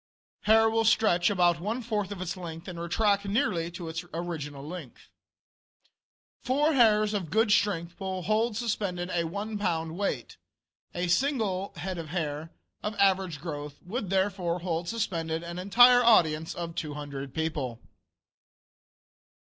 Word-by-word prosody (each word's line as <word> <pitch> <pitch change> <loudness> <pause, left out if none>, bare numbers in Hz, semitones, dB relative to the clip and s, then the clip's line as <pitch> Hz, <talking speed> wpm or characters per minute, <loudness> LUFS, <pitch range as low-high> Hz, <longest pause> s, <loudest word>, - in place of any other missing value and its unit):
Hair 225 +1 +6
will 225 0 +2
stretch 210 -5 +4
about 175 -4 +3
one 215 +7 -2
fourth 210 -4 -2
of 200 - -5
its 180 - -4
length 165 -3 -8
and 175 -2 -6
retract 200 +4 +1
nearly 180 -5 0
to 175 0 -7
its 165 +1 -4
original 150 -5 -5
length. 165 -7 -9 1.3
Four 290 +5 +2
hairs 215 -4 +4
of 190 -6 -2
good 220 +4 +2
strength 175 -5 +1
will 190 -2 -3
hold 215 +2 +1
suspended 195 -6 -2
a 170 -1 +1
one 205 +5 -4
pound 165 -4 -1
weight. 200 +2 -3 0.6
A 180 +1 -1
single 200 -3 0
head 185 -1 -4
of 160 -2 -7
hair, 155 -2 -3 0.3
of 210 +1 -3
average 190 -6 +2
growth, 145 -2 -6
would 210 +1 -4
therefore 190 -3 0
hold 170 -1 -2
suspended 165 -7 -2
an 170 +1 -6
entire 245 +6 +6
audience 160 -8 +4
of 170 -1 -5
200 145 -3 -5
people. 150 -6 -3
180 Hz, 140 wpm, -28 LUFS, 165-210 Hz, 1.3 s, Hair